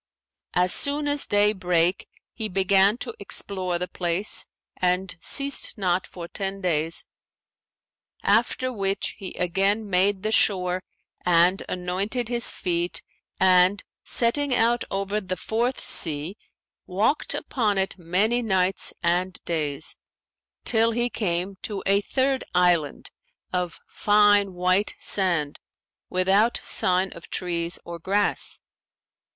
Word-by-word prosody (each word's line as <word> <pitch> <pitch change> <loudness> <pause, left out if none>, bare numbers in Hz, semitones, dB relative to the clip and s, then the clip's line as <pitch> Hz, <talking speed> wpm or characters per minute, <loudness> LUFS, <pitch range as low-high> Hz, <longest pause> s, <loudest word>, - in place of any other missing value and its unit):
As 180 0 +2
soon 290 +1 0
as 290 0 +1
day 205 +1 +3
brake, 180 -2 0 0.3
he 220 -2 -4
began 195 +2 +3
to 350 - -5
explore 185 -3 -1
the 180 +1 -3
place 180 +4 0 0.3
and 180 +1 0
ceased 280 -3 +1
not 185 -2 0
for 170 -2 -9
ten 195 +2 -4
days, 165 -3 0 1.2
after 240 +4 +1
which 195 -2 -1
he 190 -3 -7
again 195 +4 0
made 190 +1 +1
the 215 - -1
shore 185 -4 +2 0.4
and 175 +2 +3
anointed 195 +7 -2
his 240 -1 +2
feet 175 -1 -2 0.4
and, 185 +1 +4 0.2
setting 255 +3 +2
out 235 +1 +2
over 195 +2 -2
the 185 -1 -4
Fourth 235 +8 -1
Sea, 155 +3 +1 0.5
walked 210 +11 0
upon 215 -6 -1
it 190 0 -1
many 200 +8 +1
nights 190 -4 0
and 180 +1 0
days, 150 -4 -1 0.7
till 225 -1 +3
he 240 +1 -1
came 185 -1 -2
to 205 -3 -5
a 200 +1 +3
third 265 +4 0
island 175 -5 +1 0.4
of 180 -2 -2
fine 205 -2 +3
white 185 +3 +1
sand 170 -7 0 0.5
without 195 +5 +2
sign 185 +1 +2
of 170 - -13
trees 170 -1 -2
or 170 0 -7
grass. 200 +5 0
190 Hz, 120 wpm, -24 LUFS, 180-210 Hz, 1.2 s, and